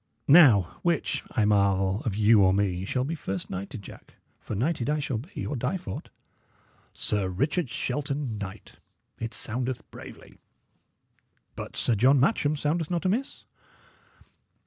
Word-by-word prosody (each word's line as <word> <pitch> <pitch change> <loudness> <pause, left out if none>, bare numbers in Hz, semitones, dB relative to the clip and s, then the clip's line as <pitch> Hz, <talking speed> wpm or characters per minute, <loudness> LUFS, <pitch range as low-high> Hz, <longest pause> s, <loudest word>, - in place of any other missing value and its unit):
Now, 130 - +6
which, 170 -4 0
I 110 -4 +1
marvel, 100 -1 +2
of 110 -5 -1
you 105 0 +5
or 95 -1 +5
me, 95 -2 0
shall 125 +5 -1
be 150 +5 -3
first 95 - -5
knighted, 100 +4 -6
Jack? - - -13 0.2
for - - -6
knighted 130 - -1
I 150 - +1
shall 140 -6 -2
be, 160 - -7
or 145 - -3
die 130 +9 -1
for 95 - -6
't. - - -23 0.8
'Sir 100 -3 -1
Richard 140 - -1
Shelton, 135 -3 -3
Knight': 95 -2 -9 0.4
it 115 0 -4
soundeth 125 +3 -3
bravely. - - -12 1.2
But - - -7
'Sir 120 - +1
John 130 +6 +4
Matcham' 150 - +2
soundeth 150 +2 -1
not 175 0 -2
amiss." 225 +9 -1
125 Hz, 145 wpm, -27 LUFS, 100-150 Hz, 1.2 s, Now